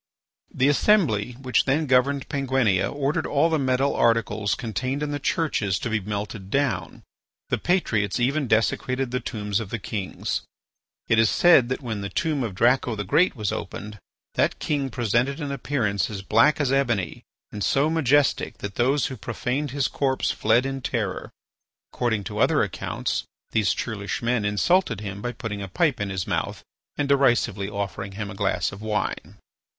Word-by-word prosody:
The 130 Hz, -, +2 dB
assembly 145 Hz, -, +3 dB
which 130 Hz, -1 st, 0 dB
then 150 Hz, +4 st, +1 dB
governed 135 Hz, +1 st, +2 dB
Penguinia 130 Hz, -, +1 dB
ordered 140 Hz, +1 st, -1 dB
all 155 Hz, +3 st, +2 dB
the 160 Hz, -, +2 dB
metal 135 Hz, +1 st, +1 dB
articles 110 Hz, -3 st, +2 dB
contained 130 Hz, +4 st, -3 dB
in 145 Hz, -, -2 dB
the 145 Hz, -, -2 dB
churches 125 Hz, -, 0 dB
to 115 Hz, -, -4 dB
be 110 Hz, -, +1 dB
melted 105 Hz, 0 st, -5 dB
down. 130 Hz, -6 st, -1 dB, 0.5 s
The -, -, 0 dB
patriots 110 Hz, -, +1 dB
even 135 Hz, +3 st, +1 dB
desecrated 125 Hz, +3 st, +1 dB
the 125 Hz, -, 0 dB
tombs 105 Hz, -5 st, -2 dB
of 110 Hz, -4 st, -6 dB
the 115 Hz, -, -2 dB
kings. 100 Hz, 0 st, -3 dB, 0.7 s
It 115 Hz, -, +3 dB
is 115 Hz, -, +5 dB
said 155 Hz, -9 st, +5 dB
that 130 Hz, +2 st, -3 dB
when 110 Hz, -4 st, -3 dB
the 100 Hz, -, -4 dB
tomb 155 Hz, -, -1 dB
of 110 Hz, -6 st, -3 dB
Draco 120 Hz, +2 st, +2 dB
the 105 Hz, -, -3 dB
Great 165 Hz, -, +3 dB
was 105 Hz, -5 st, -2 dB
opened, 105 Hz, 0 st, -6 dB, 0.3 s
that -, -, +1 dB
king 140 Hz, -3 st, -1 dB
presented 120 Hz, +4 st, 0 dB
an 145 Hz, -3 st, -3 dB
appearance 120 Hz, -7 st, -1 dB
as 100 Hz, -2 st, -6 dB
black 115 Hz, +11 st, +4 dB
as 140 Hz, -3 st, +1 dB
ebony 120 Hz, -9 st, 0 dB, 0.3 s
and 105 Hz, -1 st, -4 dB
so 140 Hz, +8 st, +2 dB
majestic 145 Hz, -3 st, +2 dB
that 105 Hz, -1 st, -7 dB
those 135 Hz, +3 st, +2 dB
who 135 Hz, -, -4 dB
profaned 125 Hz, +5 st, -3 dB
his 140 Hz, 0 st, 0 dB
corpse 135 Hz, -2 st, 0 dB
fled 115 Hz, +4 st, +2 dB
in 135 Hz, 0 st, -3 dB
terror. 110 Hz, -7 st, -3 dB, 0.6 s
According 110 Hz, -4 st, 0 dB
to -, -, -5 dB
other -, -, +4 dB
accounts, -, -, -3 dB, 0.3 s
these 110 Hz, -3 st, +2 dB
churlish 105 Hz, 0 st, -3 dB
men 120 Hz, -2 st, +1 dB
insulted 115 Hz, -, +2 dB
him 100 Hz, -1 st, -6 dB
by 120 Hz, -, -2 dB
putting 110 Hz, -4 st, -5 dB
a 100 Hz, -, -4 dB
pipe 145 Hz, -, +1 dB
in 100 Hz, -, -1 dB
his 95 Hz, -2 st, -2 dB
mouth -, -, -2 dB, 0.3 s
and 145 Hz, -, 0 dB
derisively 120 Hz, -7 st, +2 dB
offering 100 Hz, -1 st, -4 dB
him 100 Hz, 0 st, -5 dB
a -, -, -7 dB
glass 95 Hz, -4 st, 0 dB
of 100 Hz, -, -10 dB
wine. 105 Hz, -2 st, -3 dB
120 Hz, 175 wpm, -24 LUFS, 105-140 Hz, 0.7 s, is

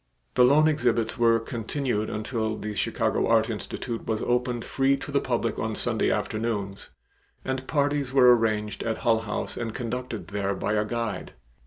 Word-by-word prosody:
The 125 Hz, -, +5 dB
loan 145 Hz, +5 st, +6 dB
exhibits 120 Hz, -6 st, +1 dB
were 115 Hz, -1 st, +5 dB
continued 115 Hz, 0 st, -2 dB
until 110 Hz, 0 st, -2 dB
the 105 Hz, 0 st, -4 dB
Chicago -, -, 0 dB
Art 115 Hz, 0 st, +3 dB
Institute 115 Hz, +2 st, -5 dB
was 110 Hz, -1 st, -1 dB
opened 125 Hz, -1 st, 0 dB
free 135 Hz, 0 st, +2 dB
to 140 Hz, -, -7 dB
the 140 Hz, -, +2 dB
public 115 Hz, -3 st, -1 dB
on 110 Hz, -1 st, -2 dB
Sunday -, -, +1 dB
afternoons 105 Hz, -3 st, -2 dB, 0.6 s
and 130 Hz, 0 st, -3 dB
parties 145 Hz, -2 st, 0 dB
were 125 Hz, -2 st, +7 dB
arranged 110 Hz, -2 st, -1 dB
at 115 Hz, -1 st, -1 dB
Hull 115 Hz, -1 st, +4 dB
House 110 Hz, -2 st, -3 dB
and 115 Hz, -2 st, -4 dB
conducted 120 Hz, -6 st, -4 dB
there 100 Hz, -1 st, -1 dB
by 100 Hz, -, -1 dB
a 105 Hz, 0 st, +1 dB
guide. 115 Hz, -1 st, -3 dB
115 Hz, 165 wpm, -26 LUFS, 110-125 Hz, 0.6 s, were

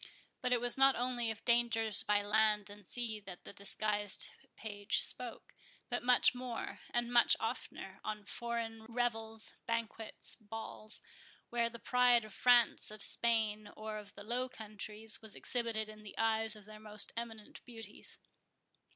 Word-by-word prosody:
But 250 Hz, -, 0 dB
it 245 Hz, -, +5 dB
was 245 Hz, +2 st, +5 dB
not 270 Hz, 0 st, +7 dB
only 245 Hz, -1 st, 0 dB
of 220 Hz, 0 st, -5 dB
dangers 225 Hz, -3 st, +4 dB
by 205 Hz, 0 st, +2 dB
land 210 Hz, 0 st, +3 dB
and 205 Hz, -2 st, -12 dB
sea 230 Hz, -3 st, -3 dB
that 190 Hz, -3 st, -10 dB
the -, -, -9 dB
disguised 205 Hz, 0 st, -2 dB, 0.3 s
page 205 Hz, -2 st, -2 dB
spoke; 245 Hz, -2 st, -2 dB, 0.4 s
but 245 Hz, -, 0 dB
much 245 Hz, 0 st, +6 dB
more, 245 Hz, -2 st, -5 dB
and 240 Hz, 0 st, -1 dB
much 240 Hz, -1 st, +7 dB
oftener, 195 Hz, -4 st, -4 dB
on 210 Hz, -1 st, -4 dB
foreign 230 Hz, 0 st, -3 dB
revels, 225 Hz, -2 st, -2 dB
banquets, 230 Hz, -1 st, -4 dB
balls, 215 Hz, 0 st, -6 dB, 0.5 s
where 235 Hz, -1 st, +2 dB
the 235 Hz, -, -8 dB
pride 245 Hz, -1 st, +4 dB
of 215 Hz, -, -11 dB
France, 245 Hz, -1 st, +5 dB
of 215 Hz, -1 st, -6 dB
Spain, 215 Hz, -3 st, +2 dB
or 215 Hz, 0 st, -4 dB
of 205 Hz, -1 st, -12 dB
the 200 Hz, -, -9 dB
Low 245 Hz, +4 st, -1 dB
Countries, 215 Hz, 0 st, -6 dB
was 220 Hz, -2 st, -12 dB
exhibited 230 Hz, -3 st, -2 dB
in 215 Hz, 0 st, -11 dB
the 210 Hz, -2 st, -11 dB
eyes 225 Hz, -1 st, +4 dB
of 210 Hz, -2 st, -12 dB
their 215 Hz, 0 st, -11 dB
most 210 Hz, -1 st, -1 dB
eminent 225 Hz, -2 st, -7 dB
beauties. 225 Hz, -4 st, -8 dB
225 Hz, 155 wpm, -35 LUFS, 210-235 Hz, 0.5 s, not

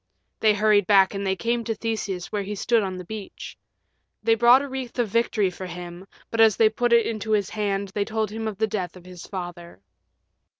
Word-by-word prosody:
They 215 Hz, -1 st, +4 dB
hurried 205 Hz, -2 st, +3 dB
back 195 Hz, -1 st, +5 dB
and 195 Hz, 0 st, -3 dB
they 190 Hz, -, +1 dB
came 235 Hz, +3 st, -1 dB
to 225 Hz, -1 st, -2 dB
Theseus 210 Hz, -5 st, -4 dB
where 210 Hz, -, -1 dB
he 205 Hz, +1 st, -5 dB
stood 230 Hz, +3 st, +2 dB
on 190 Hz, -2 st, -3 dB
the 180 Hz, -, -8 dB
beach. 215 Hz, 0 st, -8 dB, 0.7 s
They 225 Hz, +1 st, +4 dB
brought 240 Hz, +4 st, +6 dB
a -, -, -5 dB
wreath 265 Hz, -2 st, -6 dB
of 240 Hz, -3 st, 0 dB
victory 215 Hz, -3 st, +1 dB
for 185 Hz, +1 st, -7 dB
him, 175 Hz, +1 st, -9 dB, 0.2 s
but 230 Hz, -, +2 dB
as 220 Hz, -2 st, +5 dB
they 220 Hz, -1 st, +5 dB
put 240 Hz, +2 st, -1 dB
it 235 Hz, -1 st, +5 dB
into 220 Hz, -1 st, -2 dB
his 205 Hz, -3 st, 0 dB
hand 200 Hz, -2 st, -2 dB
they 200 Hz, +1 st, -1 dB
told 220 Hz, -1 st, -2 dB
him 220 Hz, +1 st, -4 dB
of 210 Hz, -3 st, -5 dB
the 220 Hz, -, +2 dB
death 190 Hz, -4 st, -4 dB
of 180 Hz, -, -16 dB
his 180 Hz, -1 st, -11 dB
father. 175 Hz, -, -8 dB
210 Hz, 220 wpm, -24 LUFS, 190-225 Hz, 0.7 s, brought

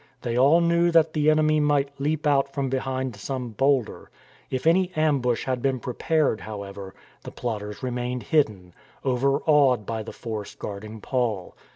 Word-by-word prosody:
They 120 Hz, -1 st, -2 dB
all 140 Hz, +7 st, +5 dB
knew 170 Hz, 0 st, +3 dB
that 165 Hz, -2 st, +4 dB
the 150 Hz, -1 st, +3 dB
enemy 155 Hz, 0 st, +3 dB
might 145 Hz, -1 st, +2 dB
leap 155 Hz, +2 st, -1 dB
out 140 Hz, -2 st, +2 dB
from 140 Hz, -1 st, -2 dB
behind 130 Hz, -2 st, -2 dB
some 125 Hz, +4 st, -4 dB
boulder. 135 Hz, +1 st, 0 dB, 0.4 s
If 130 Hz, +2 st, -3 dB
any 180 Hz, +3 st, +3 dB
ambush 140 Hz, -6 st, +1 dB
had 130 Hz, -2 st, -1 dB
been 135 Hz, -1 st, 0 dB
prepared, 135 Hz, 0 st, 0 dB
however, 100 Hz, -2 st, -8 dB, 0.3 s
the -, -, -7 dB
plotters 105 Hz, -2 st, -5 dB
remained 125 Hz, -1 st, -3 dB
hidden, 100 Hz, -, 0 dB, 0.3 s
overawed 135 Hz, -1 st, +3 dB
by 110 Hz, +1 st, -3 dB
the 110 Hz, -, -7 dB
force 110 Hz, -3 st, -6 dB
guarding 105 Hz, +2 st, -7 dB
Paul. 115 Hz, -8 st, -2 dB
130 Hz, 155 wpm, -25 LUFS, 115-150 Hz, 0.4 s, all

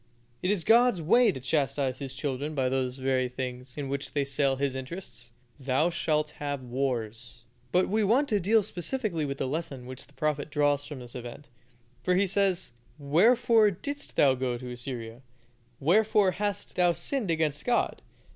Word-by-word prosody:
It 180 Hz, -, 0 dB
is 200 Hz, -4 st, +1 dB
God's 235 Hz, -2 st, +5 dB
way 220 Hz, +8 st, +4 dB
to 130 Hz, -, -7 dB
chastise 135 Hz, -1 st, -1 dB
His 135 Hz, -2 st, -6 dB
children 145 Hz, +2 st, -3 dB
by 130 Hz, -2 st, +1 dB
those 130 Hz, -1 st, -1 dB
very 130 Hz, -1 st, 0 dB
things 125 Hz, 0 st, -6 dB
in 145 Hz, -2 st, -3 dB
which 140 Hz, +1 st, -4 dB
they 145 Hz, -1 st, +1 dB
sell 135 Hz, 0 st, +1 dB
His 135 Hz, 0 st, -1 dB
interests. 130 Hz, -3 st, -7 dB, 0.3 s
"Thou 135 Hz, +5 st, +1 dB
shalt 150 Hz, -3 st, 0 dB
have 145 Hz, -2 st, -3 dB
wars." 120 Hz, -2 st, -3 dB, 0.3 s
But 180 Hz, +1 st, +3 dB
we 215 Hz, +2 st, +1 dB
want 245 Hz, +8 st, +3 dB
to 210 Hz, -, +2 dB
deal 210 Hz, +4 st, +3 dB
specially 180 Hz, -, -2 dB
with 140 Hz, -1 st, -4 dB
the 135 Hz, -, -2 dB
lesson 140 Hz, -3 st, -4 dB
which 130 Hz, 0 st, -9 dB
the 145 Hz, -, -24 dB
prophet 150 Hz, 0 st, -1 dB
draws 145 Hz, -1 st, +1 dB
from 145 Hz, -4 st, -7 dB
this 120 Hz, -1 st, -10 dB
event; 125 Hz, +3 st, -9 dB, 0.5 s
for 180 Hz, -, +1 dB
he 195 Hz, +2 st, +3 dB
says, 190 Hz, -6 st, 0 dB, 0.2 s
"Wherefore 215 Hz, -, +4 dB
didst 285 Hz, +10 st, -7 dB
thou 140 Hz, -2 st, +5 dB
go 125 Hz, -1 st, -2 dB
to 125 Hz, 0 st, -7 dB
Assyria? 120 Hz, -1 st, -7 dB, 0.6 s
Wherefore 205 Hz, -, +3 dB
hast 205 Hz, +1 st, -3 dB
thou 175 Hz, -1 st, +4 dB
sinned 200 Hz, -, -2 dB
against 155 Hz, -3 st, 0 dB
God? 245 Hz, -1 st, 0 dB
145 Hz, 175 wpm, -28 LUFS, 130-185 Hz, 0.6 s, God's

